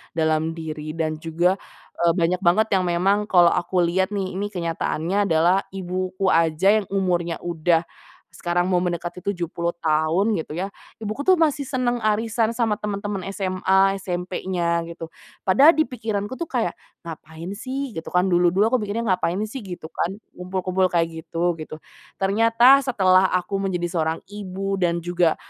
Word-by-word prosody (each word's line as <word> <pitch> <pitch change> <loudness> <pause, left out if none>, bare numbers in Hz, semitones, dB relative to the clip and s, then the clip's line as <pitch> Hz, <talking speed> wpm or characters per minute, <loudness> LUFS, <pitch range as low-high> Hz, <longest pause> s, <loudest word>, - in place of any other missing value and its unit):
dalam 160 0 +1
diri, 155 -1 -6
dan 155 -1 -2
juga, 170 +4 +1 0.4
e - - -1
banyak 180 0 +1
banget 195 +4 +3
yang 185 - -1
memang 195 +4 +1
kalau 175 -4 +5
aku 180 0 +1
lihat 190 +4 0
nih, 190 -2 -2
ini 205 +1 -1
kenyataannya 175 +1 -1
adalah 170 +3 +3 0.2
ibuku 185 +1 -2
aja 165 +6 +3
yang 200 - -7
umurnya 175 -3 0
udah 170 -1 +1 0.5
sekarang 175 0 -1
mau 180 - +3
mendekati 175 0 -3
70 170 -3 -3
tahun, 160 +7 +2
gitu 155 -1 -6
ya, 190 +4 -3 0.3
ibuku 215 +4 -4
tuh 375 - +7
masih 300 -5 +1
senang 250 -2 0
arisan 225 +1 0
sama 225 -3 0
teman-temen 205 -2 -4
SMA, 195 0 +1
SMP-nya, 180 -1 -2
gitu. 165 -1 -8 0.3
Padahal 275 - +6
di 315 - +4
pikiranku 220 -3 -4
tuh 335 - -3
kayak, 235 - -1 0.3
ngapain 165 +1 -8
sih? 260 +6 -4
Gitu 160 -6 -7
kan, 180 +1 +1
dulu-dulu 180 +5 +3
aku 255 - +3
mikirnya 210 +2 -3
ngapain 180 -1 0
sih? 215 +5 -5
Gitu 185 -8 -8
kan, 185 +3 -2 0.2
kumpul-kumpul 185 +1 -1
kayak 165 -2 0 0.2
gitu-gitu. 165 -2 -2 0.4
Ternyata 230 +7 +5
setelah 190 -8 +3
aku 185 +2 -1
menjadi 180 -3 -2
seorang 160 +1 0
ibu, 195 -1 -4
dan 170 -2 0
juga, 175 -1 +2
185 Hz, 155 wpm, -23 LUFS, 170-205 Hz, 0.5 s, tuh